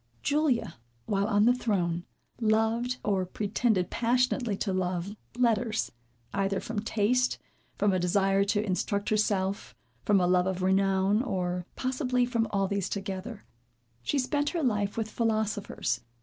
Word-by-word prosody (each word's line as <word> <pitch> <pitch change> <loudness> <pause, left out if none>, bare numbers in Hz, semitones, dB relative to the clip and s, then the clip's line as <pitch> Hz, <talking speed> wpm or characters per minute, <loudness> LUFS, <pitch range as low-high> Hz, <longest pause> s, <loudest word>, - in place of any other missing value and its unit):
Julia, 290 - +1 0.3
while 200 +5 0
on 205 -1 +3
the 245 - +6
throne, 180 -8 -1 0.3
loved, 225 +2 +1
or 195 -3 +1
pretended 200 0 0
passionately 245 -2 +1
to 195 -2 -1
love, 185 +1 -2 0.2
letters. 230 -2 +1 0.4
Either 195 0 0
from 225 -1 -4
taste, 230 +3 +1 0.4
from 205 -2 +2
a 185 - +2
desire 195 +2 +2
to 205 +1 +1
instruct 200 +1 -1
herself, 200 - 0 0.3
from 205 -2 +4
a 180 - +3
love 180 0 +3
of 190 -1 -2
renown, 195 +2 +3
or 180 -6 -2
possibly 255 -1 0
from 230 -2 0
all 195 -2 +1
these 200 -1 -1
together, 200 +2 -5 0.6
she 200 - -1
spent 290 +2 +1
her 335 -1 -2
life 205 -5 0
with 225 -1 -1
philosophers. 215 - -1
205 Hz, 140 wpm, -29 LUFS, 190-235 Hz, 0.6 s, the